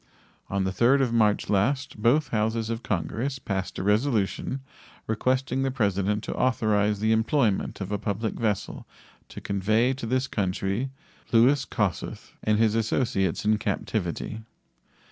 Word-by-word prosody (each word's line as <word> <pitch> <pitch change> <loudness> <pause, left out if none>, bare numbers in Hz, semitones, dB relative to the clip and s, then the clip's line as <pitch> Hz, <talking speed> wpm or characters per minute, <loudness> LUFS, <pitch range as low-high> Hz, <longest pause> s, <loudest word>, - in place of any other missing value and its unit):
On 100 0 0
the 95 - 0
3d 125 +7 +4
of 120 -3 -1
March 105 -3 +2
last 120 +4 0
both 140 +6 +3
Houses 110 +1 0
of 115 0 -3
Congress 115 - -2
passed 95 -6 -4
a - - -3
resolution 110 +3 0 0.4
requesting 130 +3 0
the 135 - +1
President 105 -4 0
to - - -4
authorize 105 -5 +1
the 110 +1 +2
employment 110 -1 +1
of 95 +1 -4
a 105 - -1
public 105 +1 -2
vessel 105 -4 -2 0.4
to - - -8
convey 110 +6 +1
to 130 -3 -6
this 130 +3 +1
country 100 +3 -1 0.4
Louis 125 +4 +4
Kossuth - - -3
and 110 -1 +2
his 110 -1 +3
associates 110 -5 0
in 105 0 +3
captivity. 100 0 -2
110 Hz, 145 wpm, -26 LUFS, 100-125 Hz, 0.4 s, 3d